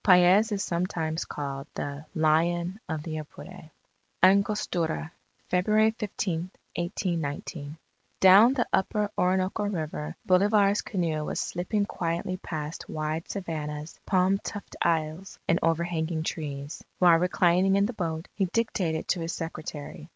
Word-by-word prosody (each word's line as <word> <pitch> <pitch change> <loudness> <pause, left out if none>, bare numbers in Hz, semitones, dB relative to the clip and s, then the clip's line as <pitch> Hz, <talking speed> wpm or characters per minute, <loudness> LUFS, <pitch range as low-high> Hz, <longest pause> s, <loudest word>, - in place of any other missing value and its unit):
Paez 185 +4 +6
is 200 -1 0
sometimes 170 -2 -2
called 140 -1 -5
the 145 +1 -4
"Lion 170 +4 +2
of 155 -2 -3
the 155 -1 -4
Apure." 155 +2 -11 0.5
ANGOSTURA 185 -4 +2 0.4
February 215 +4 +4
15, 190 -6 -3 0.3
1819 165 -3 -3 0.4
Down 205 +7 +8
the 245 - +1
upper 205 +2 +1
Orinoco 185 +3 +1
River, 155 - -3
Bolivar's 200 +2 +4
canoe 165 -6 -1
was - - -3
slipping 200 +4 -1
quietly 175 0 -2
past 155 -3 -6
wide 155 +1 -3
savannahs, 155 -5 -5
palm 190 0 +3
tufted 205 - -7
isles, 165 +3 -1
and 165 - +3
overhanging 165 -1 0
trees. 145 -2 -5
While 175 -2 +6
reclining 180 +2 +3
in 200 0 +4
the 240 - -3
boat, 165 -4 -3
he 195 - +1
dictated 180 -5 -1
to 180 - +1
his 165 0 -3
secretary. 155 -1 -6
175 Hz, 125 wpm, -27 LUFS, 160-195 Hz, 0.5 s, Down